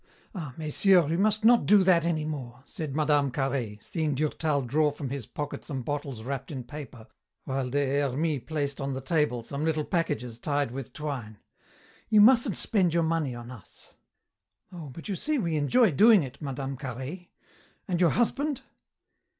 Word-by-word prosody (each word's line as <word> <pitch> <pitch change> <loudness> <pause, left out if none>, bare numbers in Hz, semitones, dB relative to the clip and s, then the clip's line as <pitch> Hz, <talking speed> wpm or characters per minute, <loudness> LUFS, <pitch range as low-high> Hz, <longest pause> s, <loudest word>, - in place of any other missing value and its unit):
Ah, 155 - -6
messieurs, 165 +2 +3
you 165 - +1
must 215 +1 +2
not 240 +1 +5
do 205 -2 +6
that 175 -3 +4
any 160 -3 0
more," 130 -5 -6
said 150 -4 -6
Mme. 145 -2 +2
Carhaix, 125 -6 -3
seeing 155 -4 -1
Durtal 150 0 0
draw 150 +5 +2
from 145 -2 -6
his 135 -5 -5
pocket 145 -1 -5
some 135 -5 -5
bottles 140 -4 -4
wrapped 135 +1 -4
in 130 -4 -5
paper, 130 -4 -9 0.4
while 135 -1 -2
Des 140 +1 +1
Hermies 145 +1 -1
placed 145 -3 -2
on 135 -1 -2
the - - -3
table 135 -4 0
some 140 +5 -4
little 155 -1 0
packages 145 - -2
tied 145 -1 -1
with 135 0 -6
twine. 130 -8 -5 0.7
"You 215 -2 +5
mustn't 235 - +5
spend 180 -6 +1
your 170 - +3
money 160 -6 0
on 120 +1 -9
us." 115 -7 -13 0.8
"Oh, 165 -5 -8
but 160 +6 -10
you 200 - -2
see 300 - -1
we 170 - -1
enjoy 190 - +3
doing 210 +3 +6
it, 130 +2 -9
Mme. 135 -1 -4
Carhaix. 135 +7 -6 0.6
And 180 -1 -1
your 175 - +5
husband?" 275 - 0
145 Hz, 175 wpm, -27 LUFS, 135-170 Hz, 0.8 s, do